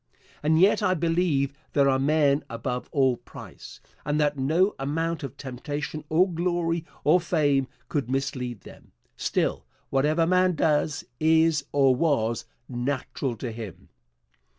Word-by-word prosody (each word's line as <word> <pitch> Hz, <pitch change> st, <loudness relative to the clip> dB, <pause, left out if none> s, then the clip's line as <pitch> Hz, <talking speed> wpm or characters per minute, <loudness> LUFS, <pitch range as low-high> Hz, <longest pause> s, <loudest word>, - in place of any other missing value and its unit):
And 155 Hz, +2 st, +3 dB
yet 195 Hz, +5 st, +5 dB
I 185 Hz, -3 st, +2 dB
believe 165 Hz, -5 st, +1 dB, 0.2 s
there 140 Hz, -2 st, +4 dB
are 130 Hz, -1 st, +3 dB
men 145 Hz, 0 st, +3 dB
above 125 Hz, +2 st, -4 dB
all 130 Hz, -4 st, +2 dB
price, -, -, -12 dB, 0.2 s
and 150 Hz, +1 st, 0 dB
that 150 Hz, -1 st, +2 dB
no 160 Hz, +9 st, +2 dB
amount 165 Hz, +4 st, -1 dB
of 135 Hz, -5 st, -7 dB
temptation 145 Hz, +3 st, -5 dB
or 175 Hz, +4 st, +4 dB
glory 170 Hz, -1 st, -1 dB, 0.2 s
or 160 Hz, +5 st, +5 dB
fame 145 Hz, -6 st, +1 dB, 0.2 s
could 140 Hz, -5 st, -2 dB
mislead 130 Hz, -4 st, -2 dB
them. -, -, -15 dB, 0.2 s
Still, -, -, -1 dB, 0.2 s
whatever 150 Hz, +5 st, +2 dB
man 180 Hz, 0 st, +3 dB
does, 150 Hz, -1 st, +1 dB, 0.2 s
is 160 Hz, -2 st, +3 dB
or 135 Hz, -2 st, +4 dB
was 125 Hz, -6 st, 0 dB, 0.2 s
natural 130 Hz, 0 st, -3 dB
to 115 Hz, +2 st, -5 dB
him. 110 Hz, -5 st, -9 dB
145 Hz, 135 wpm, -26 LUFS, 135-165 Hz, 0.2 s, yet